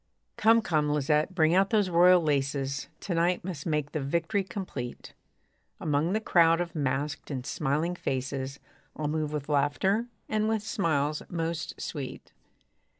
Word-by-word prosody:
Come, 225 +1 +4
come, 155 -5 +1
Lisette, 150 +4 +1
bring 160 -2 +4
out 195 +2 +4
those 205 -5 +2
royal 175 +1 +6
laces; 140 -2 -1
To 190 - -3
night 170 +2 +1
must 170 -6 -5
make 150 -2 -1
the 155 - -2
victory 170 +8 0
complete. 170 -10 -6 0.7
Among 155 +4 0
the 215 - +2
crowd 165 -5 +4
of 175 -2 -3
masked 145 0 -2
and 130 -3 -4
smiling 155 +5 -1
faces, 135 -3 -3 0.4
I'll 150 - -2
move 155 0 -1
with 150 -2 -4
laughter, 155 +10 +1 0.2
and 215 0 0
with 220 -2 0
smiles 155 -9 0
most 170 0 -3
sweet. 135 -4 -6
155 Hz, 150 wpm, -28 LUFS, 145-180 Hz, 0.7 s, royal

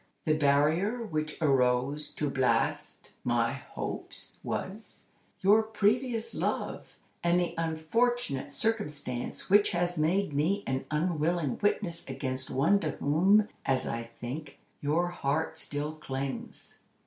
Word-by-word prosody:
The 155 - +3
barrier 155 +10 +2
which 155 -7 -3
arose 135 +1 +2
to 150 - -1
blast 130 -1 0
my 120 0 +2
hopes 140 - -7
was, 210 +4 -5 0.4
your 205 +3 +6
previous 220 +2 0
love, - - -3 0.3
and 175 +1 +4
the 175 - -1
unfortunate 165 - 0
circumstance 145 - -2
which 205 +1 +5
has 175 -1 0
made 175 +2 +1
me 175 +8 +1
an 130 0 -2
unwilling 160 -2 0
witness 180 -5 0
against 130 -1 -3
one 170 +10 +3
to 155 -5 -1
whom, 190 +9 +4 0.2
as 130 -1 +1
I 115 0 -4
think, 140 +6 -6 0.2
your 160 +5 +1
heart 160 -1 -1
still 145 0 -3
clings." 135 -3 -6
155 Hz, 120 wpm, -30 LUFS, 140-195 Hz, 0.4 s, your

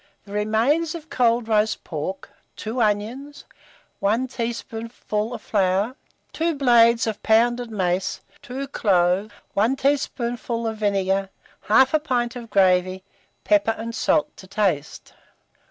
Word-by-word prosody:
The 200 - -13
remains 235 +11 +1
of 320 -1 -10
cold 235 -2 +2
roast 215 -1 +1
pork, 170 +4 -5 0.2
2 230 +3 -3
onions, 225 +7 -2 0.5
1 225 +6 +1
teaspoonful 230 -2 -4
of 240 - -7
flour, 200 +4 +1 0.4
2 330 0 0
blades 235 -3 +5
of 220 -2 -3
pounded 240 +2 +2
mace, 185 -3 -1 0.2
2 275 0 -6
cloves, 190 -3 +2 0.2
1 225 +6 +2
tablespoonful 245 -4 -1
of 220 -1 -2
vinegar, 195 -2 0 0.4
1/2 265 +8 +4
pint 245 -5 -1
of 235 -2 -8
gravy, 185 -1 +2 0.4
pepper 300 -8 +3
and 230 +1 -5
salt 300 +5 +1
to 190 - -12
taste. 185 -8 -2
225 Hz, 120 wpm, -23 LUFS, 200-250 Hz, 0.5 s, blades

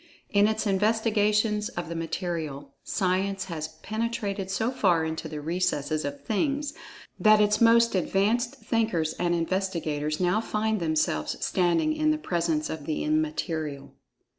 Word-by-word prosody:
In 205 0 +5
its 220 +1 -1
investigations 210 +1 +2
of 175 -8 -5
the 170 - -5
Material, 160 -4 -4
Science 190 0 0
has 160 -4 -4 0.2
penetrated 215 -3 -2
so 225 +5 0
far 180 -10 +2
into 160 0 -4
the 150 - -5
recesses 155 -2 -1
of 145 0 -5
Things 285 +6 0 0.5
that 215 -1 +6
its 210 +1 +3
most 230 0 +5
advanced 215 +7 +1
thinkers 220 - 0
and 175 -1 +1
investigators 165 -4 -1
now 185 +4 +2
find 220 -1 -1
themselves 155 - 0
standing 180 - +2
in 310 0 +2
the 310 - +2
presence 170 - -1
of 155 -3 -6
the 155 - -1
Immaterial. 170 - -2
195 Hz, 140 wpm, -27 LUFS, 165-220 Hz, 0.5 s, that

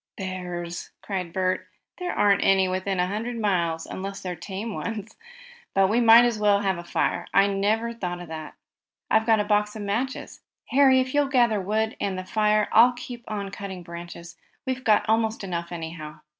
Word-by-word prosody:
"Bears!" 180 -2 -5
cried 185 -4 -4
Bert 185 +1 -1 0.3
"There 360 0 -2
aren't 205 -2 +3
any 190 -1 +4
within 185 +1 -2
a 180 - +3
hundred 220 +6 -3
miles, 170 -6 0
unless 195 +1 -6
they're 180 -1 -5
tame 195 +6 -6
ones. 220 -1 -5 0.6
But 195 -1 +4
we 230 +4 +2
might 230 +1 +8
as 235 -3 0
well 205 -1 +3
have 190 -3 0
a - - -7
fire. 175 0 -1
I 195 - +6
never 210 +4 0
thought 180 -6 -4
of 175 - -9
that. 160 -1 -8 0.6
I've 220 +1 +3
got 220 -1 +4
a - - +2
box 210 0 +1
of 215 - -5
matches. 235 +7 -3 0.3
Harry, 265 -1 +5
if 255 0 -4
you'll 290 -1 +3
gather 240 -6 +2
wood, 220 +3 -1
and 195 -2 -2
the 185 - -5
fire, 210 +1 +2
I'll 240 +3 +6
keep 240 -1 -9
on 200 -2 -4
cutting 190 -3 -7
branches. 170 0 -9 0.3
We've 260 0 -3
got 215 -4 +3
almost 220 -1 +1
enough, 170 -2 -4
anyhow." 160 -2 -7
200 Hz, 185 wpm, -25 LUFS, 185-225 Hz, 0.6 s, might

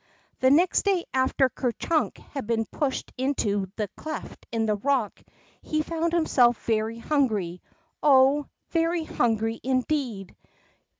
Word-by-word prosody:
The 260 - +4
next 340 +6 +4
day 385 -4 +2
after 260 0 +3
Ker 250 -1 -2
Chiink 320 +5 0
had 275 -6 -5
been 225 -1 0
pushed 275 +4 -3
into 210 -8 0
the 210 -2 -2
cleft 310 -1 -8
in 225 -1 0
the 215 - +2
rock, 255 -2 0 0.4
he 310 0 -1
found 330 +1 -1
himself 250 -8 +3
very 220 0 0
hungry, 220 - 0 0.4
oh, 275 0 +5 0.2
very 330 0 +1
hungry 225 -5 0
indeed 255 -6 -1
260 Hz, 130 wpm, -26 LUFS, 225-305 Hz, 0.4 s, oh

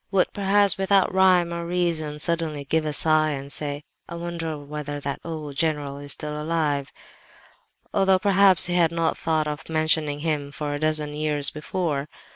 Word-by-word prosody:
—would 195 -2 +1
perhaps, 200 0 +2
without 195 -1 +2
rhyme 185 -2 +3
or 170 0 -4
reason, 170 -4 -2
suddenly 160 -3 -2
give 155 +2 0
a - - -1
sigh 155 +1 +2
and 140 -1 -5
say, 145 -1 -4 0.3
"I 170 - -6
wonder 170 -2 -5
whether 145 0 -6
that 140 -1 -4
old 155 -4 -6
general 150 -4 -1
is 145 0 -3
alive 150 -2 -2
still!" - - -22 1.0
Although 190 -1 +4
perhaps 195 -1 +7
he 175 - -2
had 170 -2 +3
not 165 -1 0
thought 160 -2 -1
of 150 -1 -6
mentioning 155 -2 0
him 150 -3 -2
for 145 0 -4
a 145 - -4
dozen 155 -1 -1
years 150 -1 +2
before! 150 -2 -3
155 Hz, 170 wpm, -24 LUFS, 150-170 Hz, 1.0 s, perhaps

